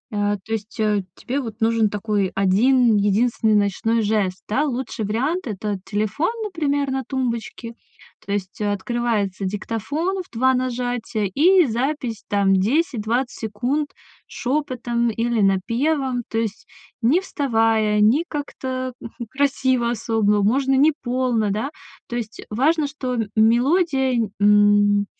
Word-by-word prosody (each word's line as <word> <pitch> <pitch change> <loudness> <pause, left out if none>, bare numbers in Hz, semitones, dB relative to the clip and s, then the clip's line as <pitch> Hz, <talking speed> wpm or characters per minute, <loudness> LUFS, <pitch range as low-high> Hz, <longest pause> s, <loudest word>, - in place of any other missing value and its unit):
а, 205 0 +1
то 220 - -11
есть, 220 +1 -5
э, 210 -2 +1
тебе 275 +3 -3
вот 225 -4 -6
нужен 225 -1 +2
такой 205 -2 -1
1 220 +4 +4
единственный 215 +2 +2
ночной 210 +3 +1
жест, 205 -3 0
да. 260 +8 +1
Лучший 255 -5 -3
вариант- 270 - -1
это 205 -1 -3
телефон, 215 - -1
например, 290 -8 -1
на 265 0 -2
тумбочке, 235 -2 -4 0.5
то 200 - -5
есть 200 0 -3
открывается 205 -1 -1
диктофон 280 - -2
в 360 - -14
2 260 +3 +2
нажатия 245 -3 -2
и 360 - +5
запись 245 -2 -2
там 200 -1 +3
10-20 240 - +1
секунд 250 +7 -1 0.4
шепотом, 245 -3 -1
или 230 0 0
напевом, 245 +7 +1
то 225 - -3
есть 225 -2 -3 0.3
не 255 +10 +4
вставая, 225 - +1
не 235 +10 +4
как-то, 260 -3 -4
хм, 235 +1 -8
красиво 260 -3 +1
особо, 215 -3 +1
можно 270 +5 +2
не 290 +3 +4
полно, 245 -4 0
да, 220 +8 -2 0.4
то 240 - -5
есть, 220 -2 -6
э, - - -10
важно, 295 +7 +2
что, 260 -3 -4
м 225 -3 -1
мелодия, 265 +5 +3
н 220 -3 -1 0.7
м, 205 - -1
235 Hz, 135 wpm, -22 LUFS, 210-265 Hz, 0.7 s, и